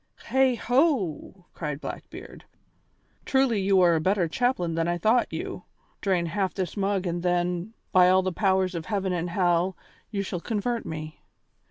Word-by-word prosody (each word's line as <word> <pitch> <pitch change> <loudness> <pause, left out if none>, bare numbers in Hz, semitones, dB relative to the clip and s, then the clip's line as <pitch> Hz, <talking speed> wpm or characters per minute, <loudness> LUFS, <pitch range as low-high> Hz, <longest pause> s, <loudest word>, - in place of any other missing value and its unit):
"Heigho!" 250 - +1
cried 150 -3 -4
Blackbeard. - - -9 0.8
"Truly 265 -6 +2
you 190 -1 +4
are 175 -1 +5
a 160 - +1
better 185 0 +2
chaplain 180 -3 0
than 165 0 0
I 175 0 0
thought 220 +7 +2
you. - - -5 0.4
Drain 185 -4 +1
half 190 +2 -2
this 185 -4 -3
mug 195 -1 0
and 175 0 -2
then, 180 +3 -1 0.2
by 180 -1 +6
all 185 0 +4
the 185 -1 -2
powers 190 -1 +1
of 165 -2 -5
heaven 195 -3 -1
and 175 0 -2
hell, 175 0 +1 0.3
you 200 -2 -2
shall 185 -2 -4
convert 230 +4 -2
me. 155 -1 -6
185 Hz, 160 wpm, -26 LUFS, 175-205 Hz, 0.8 s, by